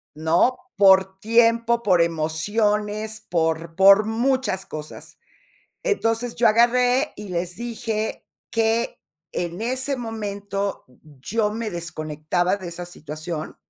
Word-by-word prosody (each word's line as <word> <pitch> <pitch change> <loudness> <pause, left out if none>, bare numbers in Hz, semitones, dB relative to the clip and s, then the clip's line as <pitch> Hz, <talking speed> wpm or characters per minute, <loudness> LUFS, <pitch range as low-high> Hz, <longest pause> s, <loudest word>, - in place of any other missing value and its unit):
¿No?, 160 +11 +2 0.2
por 190 -1 +5
tiempo, 230 +1 +3
por 185 -6 +3
emociones, 210 +7 -1
por 165 -1 -1
por 195 +2 +7
muchas 235 -3 0
cosas. 155 -4 -9 0.6
Entonces, 240 - 0
yo 235 -1 +4
agarré, 245 +5 +3
y 210 - -9
les 175 0 -3
dije: 225 -2 -4 0.2
"Que 225 +1 0 0.3
en 175 +2 -3
ese 260 +4 -1
momento 205 -3 -4 0.4
yo 210 - 0
me 225 0 -3
desconectaba 170 +1 -2
de 190 -3 -8
esa 175 +1 -6
situación. 155 -1 -7
205 Hz, 110 wpm, -23 LUFS, 175-230 Hz, 0.6 s, por